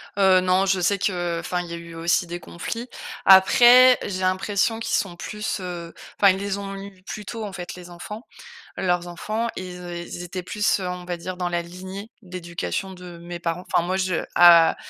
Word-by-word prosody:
Heu, 190 -2 +5
non, 185 +1 +2
je 190 -1 +2
sais 200 +3 +2
que, 175 -3 -1
enfin, 180 +1 -2
il 175 - -8
y - - -4
a - - -3
eu 170 0 -10
aussi 170 +2 +1
des 175 +1 -5
conflits. 230 +8 -6 0.4
Après, 245 +6 +8
j'ai 185 -2 -4
l'impression 200 +4 0
qu'ils 225 0 -1
sont 185 -3 -1
plus, 210 +4 -4
heu, 175 -2 -6 0.3
enfin, 200 -1 +7
ils 190 - -2
les 200 0 -2
ont 195 0 -6
eu 195 -1 -10
plus 210 +2 -7
tôt 225 +2 -5
en 200 - -7
fait 180 -2 -7
les 180 -1 -11
enfants. 210 +6 -8 0.5
Leurs 180 -2 0
enfants 215 +7 -3
ils 185 -1 -6
é 175 0 -6
ils 175 - -7
étaient 180 +1 -5
plus, 210 +2 0
heu, 185 - -3
on 180 0 -5
va 175 0 -3
dire, 180 +2 -6
dans 180 -1 -2
la 175 0 -1
lignée 185 +5 -9
d'éducation 180 +1 -5
de 180 -2 -11
mes 175 +1 -7
parents. 170 +1 -3
Enfin - - +4
moi 185 +1 0
je 185 -3 -1
a 170 -2 +7
185 Hz, 215 wpm, -23 LUFS, 175-195 Hz, 0.5 s, Après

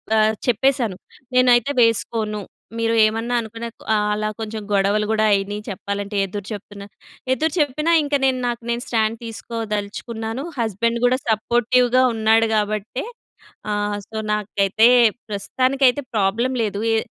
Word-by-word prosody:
ఆహ్, 220 0 +4
చెప్పేశాను. 245 -3 +1 0.4
నేనైతే 250 +1 +4
వేసుకోను. 220 -2 0 0.4
మీరు 230 0 +1
ఏమన్నా 225 +3 -1
అనుకున్న. 230 +1 -7 0.3
ఆహ్, 210 -1 +1
అలా 215 0 -1
కొంచెం 220 -1 -5
గొడవలు 200 +2 +2
గూడా 220 0 +2
అయినియి 200 +1 -1
చెప్పాలంటే, 200 +1 -4
ఎదురుచెప్తున్నా. 205 +1 -7 0.5
ఎదురుచెప్పినా 305 0 0
ఇంక 290 0 -5
నేను, 260 -1 +1
నాకు 235 0 -3
నేను 235 +1 -1
స్టాండ్ 225 -1 0
తీసుకోదలుచుకున్నాను. 225 +1 -5 0.2
హస్బెండ్ 230 +2 0
గూడా 250 +1 +3
సపోర్టివ్‌గా 240 +3 +2
ఉన్నాడు 225 0 +3
గాబట్టే. 215 +3 -2 0.7
ఆహ్, 205 0 -1
సో, 225 - -12 0.2
నాకైతే 210 +1 +2 0.4
ప్రస్తుతానికైతే 255 +6 +1
ప్రాబ్లమ్ 220 +5 +1
లేదు. 205 -2 -2
ఏ 225 - +3
220 Hz, 120 wpm, -21 LUFS, 210-240 Hz, 0.7 s, ఆహ్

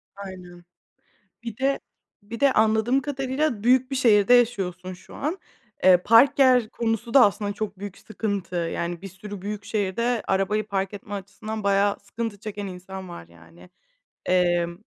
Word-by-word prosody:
Aynen. 180 -3 -10 0.8
Bir 230 -2 -6
de 275 +1 +1 0.4
bir 220 +3 -8
de 280 -1 +4
anladığım 220 +4 +2
kadarıyla 270 -3 -2
büyük 255 +2 +3
bir - - -1
şehirde 230 -2 +4
yaşıyorsun 185 -7 +1
şu 190 +1 -14
an. 315 +7 -2 0.5
Eee, 185 -1 +7
park 250 +6 +6
yer 250 -4 +5
konusu 230 0 -2
da 265 -5 +8
aslında 205 +1 -1
çok 205 -2 -5
büyük 200 -1 -7
sıkıntı. 200 -4 -4
Yani, 170 0 -3
bir 195 - -7
sürü 195 +1 -9
büyük 205 0 -5
şehirde 220 +3 -1
arabayı 210 +3 0
park 195 0 -2
etme 205 0 -8
açısından 205 +2 -6
bayağı 200 0 +2
sıkıntı 215 0 -6
çeken 205 -1 -6
insan 185 0 -8
var, 85 - -10
yani. 85 +1 -18 0.6
Emm, 175 -1 +1
205 Hz, 155 wpm, -24 LUFS, 185-230 Hz, 0.8 s, da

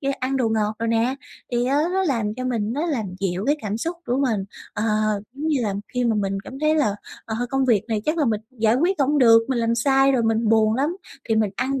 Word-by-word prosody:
ra 275 -1 -1
ăn 265 +1 -1
đồ 240 -4 +1
ngọt 215 -1 0
đồ 230 - -2
nè. 230 +3 +1 0.4
Thì, 240 0 +1
á, 275 - +1 0.2
nó 380 0 +1
làm 225 -8 -1
cho 255 - -5
mình 230 -3 -1
nó 300 +6 -1
làm 260 -10 -1 0.2
dịu 190 0 -1
cái 295 +2 +3
cảm 210 0 -2
xúc 335 +9 -3
của 245 - 0
mình, 225 -8 0 0.3
ờ, 210 - -3 0.5
giống 285 +4 -5
như 295 - +2
là, 205 -3 -1 0.2
khi 250 0 +1
mà 230 - +2
mình 195 -2 -1
cảm 265 - -9
thấy 310 0 +3
là, 280 -10 +2 0.3
ờ, 220 - -4 0.2
công 270 0 +1
việc 225 -6 +3
này 215 -2 -1
chắc 310 +2 0
là 295 - +3
mình 215 -3 0
giải 225 -3 +1
quyết 350 +6 +1
không 285 +2 +2
được, 230 -3 +6
mình 260 - 0
làm 230 0 +1
sai 270 +3 +3
rồi 245 -3 +2
mình 225 0 +1
buồn 220 -1 +3
lắm, 295 +8 0 0.3
thì 225 - +2
mình 215 -2 +2
ăn 270 +3 -1
240 Hz, 260 wpm, -23 LUFS, 220-275 Hz, 0.5 s, được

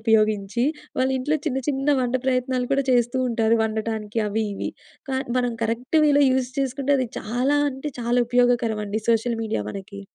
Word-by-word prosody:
ఉపయోగించి 215 0 +2 0.3
వాళ్ళ 260 - +2
ఇంట్లో 295 +5 0
చిన్న 265 -3 0
చిన్న 275 0 0
వంట 250 0 -1
ప్రయత్నాలు 255 -1 0
కూడా 275 0 +2
చేస్తూ 240 +1 +2
ఉంటారు 230 -1 +2
వండటానికి 220 0 -2
అవి 220 +2 -1
ఇవి. - - -3 0.4
కాని 265 -1 -2
మనం 245 -2 0
కరెక్ట్ 240 +7 0
వేలో 290 -1 +5
యూజ్ 255 -1 0
చేసుకుంటే 275 +1 0
అది 255 -3 -1
చాలా 250 +6 0
అంటే 270 +3 -5
చాలా 240 +1 +1
ఉపయోగకరమండి 230 -4 +1
సోషల్ 230 0 +2
మీడియా 215 - -2
మనకి. 200 - -8
245 Hz, 160 wpm, -23 LUFS, 220-260 Hz, 0.4 s, వేలో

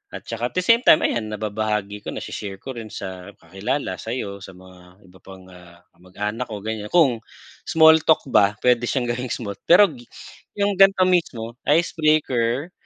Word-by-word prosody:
at - - -8
saka, 115 +1 -3
at - - -32
the 185 - 0
same 230 +4 +5
time, 155 - +5
ayan, 110 -2 -1
nababahagi 105 -1 -3
ko, - - -12
na-she-share 100 -2 -6
ko 130 - -8
rin 115 -2 -7
sa 95 -1 -9
kakilala, 95 - -4
sa'yo, 105 -4 -5
sa 95 -1 -12
mga 90 +1 -18
iba 95 +1 -19
pang, 95 -1 -14
ah, 90 -1 -17
kamag-anak 105 +7 -6
ko, 105 -2 -6
ganyan, 110 -1 -4
kung 140 -10 +3 0.5
small 160 0 +6
talk 160 - +4
ba, 100 0 +3
pwede 120 -1 +2
siyang 120 -3 -1
gawing 125 +1 -5
smooth. 100 -4 -5
Pero 190 +5 +7
gi 120 -1 -15 0.5
yung 200 0 +1
ganito 195 -1 +6
mismo, 120 -11 -1 0.2
icebreaker. 155 -3 +1
115 Hz, 175 wpm, -22 LUFS, 100-145 Hz, 0.5 s, Pero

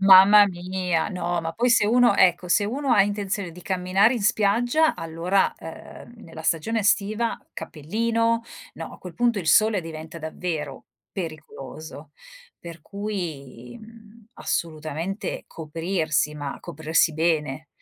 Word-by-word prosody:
Mamma 195 +2 +8
mia! 180 -2 -2
No, 175 -2 -2
ma 165 0 -4
poi 240 +6 +1
se 205 - +4
uno 240 -2 +4
ecco, 180 -1 +3
se 205 +4 +3
uno 265 +6 -1
ha 200 - +6
intenzione 200 -2 -3
di 180 +1 -12
camminare 190 +4 +2
in 230 - -3
spiaggia 235 +9 +2
allora, 165 +4 0
uhm, 165 +7 -11
nella 165 -1 -10
stagione 175 +8 0
estiva 215 +3 +1
cappellino. 230 +8 -1 0.3
No, - - -8
a - - -12
quel 180 -2 -10
punto 235 +2 +1
il 175 - -5
sole 215 +1 +4
diventa 160 0 -8
davvero 160 -3 -5 0.3
pericoloso 155 -3 -8 0.5
per 170 -2 -10
cui, 170 - -6
mhmm, 225 0 -16
assolutamente 160 +4 -4
coprirsi 160 -1 -2
ma 145 -2 -5
coprirsi 160 +1 0
bene. 155 -2 -1
180 Hz, 130 wpm, -24 LUFS, 160-210 Hz, 0.5 s, Mamma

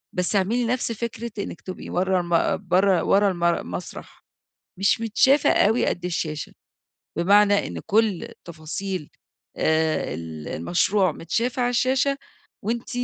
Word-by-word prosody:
بس 180 +3 0
اعملي 225 +6 +1
نفس 245 0 -1
فكرة 235 0 -5
إنِك 195 - -5
تبقي 185 - -8
ورا 185 +1 +1
الم 175 +2 +1
برا 185 0 +3
ورا 200 0 +3
المر 170 -1 +1
المسرح، 180 - -8 0.6
مش 200 +3 +2
متشافة 260 +6 +3
أوي 220 +4 +3
قد 175 - -2
الشاشة. 155 -4 -3 0.6
بمعنى 205 +3 +4
إن - - -6
كل 215 -3 +2
التفاصيل 170 +1 -6 0.5
آآ، 160 0 +1
ال 80 -2 -7
المشروع 180 - +1
متشافة 235 - -2
على 245 - +2
الشاشة، 260 +3 +1 0.5
وأنتِ 230 +2 -2
195 Hz, 130 wpm, -24 LUFS, 170-230 Hz, 0.6 s, بمعنى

